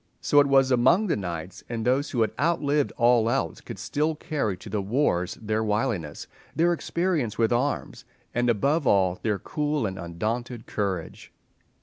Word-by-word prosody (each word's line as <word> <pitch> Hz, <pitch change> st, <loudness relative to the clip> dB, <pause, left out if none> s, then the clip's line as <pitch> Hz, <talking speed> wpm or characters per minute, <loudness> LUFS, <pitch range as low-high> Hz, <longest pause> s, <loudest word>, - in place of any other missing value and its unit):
So 145 Hz, -, +4 dB
it 145 Hz, -, +5 dB
was 135 Hz, -1 st, +4 dB
among 130 Hz, -, +4 dB
the 190 Hz, -, +1 dB
knights, 90 Hz, -2 st, -6 dB
and 115 Hz, -2 st, -3 dB
those 135 Hz, +4 st, +1 dB
who 120 Hz, -, -1 dB
had 110 Hz, -, +2 dB
outlived 150 Hz, -2 st, +1 dB
all 120 Hz, -2 st, +4 dB
else 115 Hz, -10 st, -1 dB
could -, -, -8 dB
still 155 Hz, +2 st, -1 dB
carry 145 Hz, -, -2 dB
to 110 Hz, -, -12 dB
the 105 Hz, 0 st, -2 dB
wars 95 Hz, -5 st, 0 dB
their 110 Hz, 0 st, -1 dB
wiliness, 105 Hz, -7 st, -2 dB, 0.3 s
their 170 Hz, +2 st, +3 dB
experience 170 Hz, -, -1 dB
with 115 Hz, 0 st, +2 dB
arms, 135 Hz, +4 st, -1 dB, 0.3 s
and, 120 Hz, 0 st, +1 dB
above 140 Hz, +6 st, +1 dB
all, 95 Hz, -2 st, +3 dB
their 105 Hz, -3 st, 0 dB
cool 150 Hz, +4 st, -2 dB
and 95 Hz, -2 st, -4 dB
undaunted 110 Hz, +8 st, -4 dB
courage. 95 Hz, -6 st, -4 dB
120 Hz, 165 wpm, -26 LUFS, 100-145 Hz, 0.3 s, it